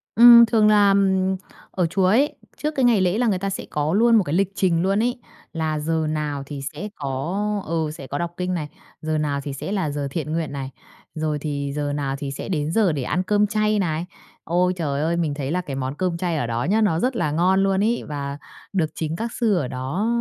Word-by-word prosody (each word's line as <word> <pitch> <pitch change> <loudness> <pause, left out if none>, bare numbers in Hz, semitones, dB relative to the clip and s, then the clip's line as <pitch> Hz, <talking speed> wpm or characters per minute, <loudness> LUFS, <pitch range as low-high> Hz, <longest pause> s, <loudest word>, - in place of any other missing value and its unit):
Ừm, 235 0 +10
thường 220 -1 +3
là, 205 -1 +5
ừm, 190 -1 +2 0.4
ở 180 -2 0
chùa 190 +2 +1
ấy, 250 +10 +3 0.2
trước 300 0 -3
cái 260 -2 +2
ngày 230 -5 +4
lễ 185 +3 +1
là 245 - +2
người 195 -4 +2
ta 195 +1 -2
sẽ 195 - -5
có 150 +2 -1
luôn 230 +3 +5
một 215 - +5
cái 150 - -4
lịch 195 0 +1
trình 170 -3 +2
luôn 200 +4 +2
ấy, 245 +1 -1 0.3
là 155 -2 -1
giờ 160 0 -1
nào 150 -2 -2
thì 140 -1 -7
sẽ 190 +8 -6
có, 175 +10 -2
ừ, 160 -1 -1
sẽ 135 -4 -9
có 145 - -3
đọc 170 +1 -2
kinh 180 0 -2
này, 150 -4 -3 0.3
giờ 155 0 -1
nào 145 -2 -1
thì 140 - -5
sẽ 165 +8 -5
là 190 -7 0
giờ 145 -1 -3
thiện 155 -1 -3
nguyện 165 -3 -2
này, 135 -1 -4 0.5
rồi 155 -1 -1
thì 140 -2 -3
giờ 145 -1 -2
nào 140 -2 -2
thì 140 -1 -4
sẽ 140 - -6
đến 155 -3 -1
giờ 200 -3 +3
để 140 -4 -2
ăn 180 +8 -1
cơm 210 +1 +2
chay 215 0 +1
này. 165 -2 -1 0.4
Ôi 180 +2 +1
trời 145 -5 -2
ơi, 165 +2 0
mình 160 -4 0
thấy 145 -1 -4
là 180 +2 0
cái 140 -5 -6
món 135 +1 -3
cơm 180 -1 -1
chay 170 -2 -1
ở 120 - -1
đó 115 +1 -1
nhá, 210 +7 +2
nó 170 -6 +2
rất 255 +3 0
là 155 -10 0
ngon 185 +4 +3
luôn 195 +1 +2
ấy, 235 +2 0
và 140 -1 -4 0.4
được 165 -5 +1
chính 160 0 -3
các 230 +6 -4
sư 225 -5 +1
ở 145 -7 0
đó 135 - -2
170 Hz, 245 wpm, -22 LUFS, 150-200 Hz, 0.5 s, Ừm